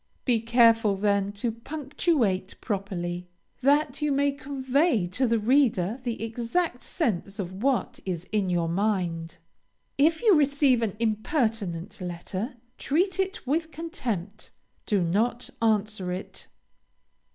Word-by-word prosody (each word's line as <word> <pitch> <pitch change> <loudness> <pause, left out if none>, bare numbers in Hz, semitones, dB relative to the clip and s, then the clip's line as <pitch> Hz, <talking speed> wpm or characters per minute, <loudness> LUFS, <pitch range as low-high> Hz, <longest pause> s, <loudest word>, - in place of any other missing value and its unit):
Be 240 -4 +3
careful, 230 -2 +4
then, 200 0 +1
to 215 +3 -2
punctuate 265 - -1
properly, 180 -4 -3 0.3
that 285 +1 +2
you 300 -1 +1
may 280 +1 +2
convey 275 - +1
to 250 +8 +1
the 230 0 +2
reader 225 -3 +2
the 235 -3 -3
exact 240 +6 -1
sense 205 - -2
of 190 -1 -5
what 255 0 0
is 180 -2 -4
in 205 -3 +1
your 170 -2 +1
mind. 175 -3 -1 0.6
If 320 +7 +3
you 435 -4 +6
receive 280 -5 +4
an 215 -4 -1
impertinent 215 - -1
letter, 185 - -4 0.2
treat 365 +6 +1
it 385 -4 -1
with 320 +5 0
contempt; 245 - -5 0.4
do 200 -5 +2
not 225 +8 0
answer 215 -4 +1
it. 185 +2 -7
225 Hz, 125 wpm, -27 LUFS, 195-275 Hz, 0.6 s, you